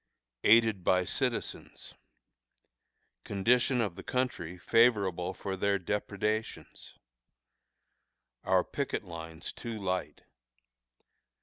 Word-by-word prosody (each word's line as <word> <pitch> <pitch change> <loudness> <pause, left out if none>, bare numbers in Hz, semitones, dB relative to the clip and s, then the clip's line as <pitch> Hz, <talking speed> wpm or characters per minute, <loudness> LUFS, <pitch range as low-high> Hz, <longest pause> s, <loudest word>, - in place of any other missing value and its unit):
Aided 110 -3 +5
by 90 +1 +3
Citizens. - - -3 1.3
Condition 120 +5 +2
of 100 -6 -2
the 95 - -8
Country 120 -10 -2
Favorable 100 -5 +3
for 95 +1 -4
their 100 +1 +1
Depredations. 105 +3 -3 1.5
Our - - +3
Picket - - -3
Lines 80 -1 -7
too 115 -2 -6
Light. 90 -6 -3
100 Hz, 85 wpm, -30 LUFS, 90-115 Hz, 1.5 s, Aided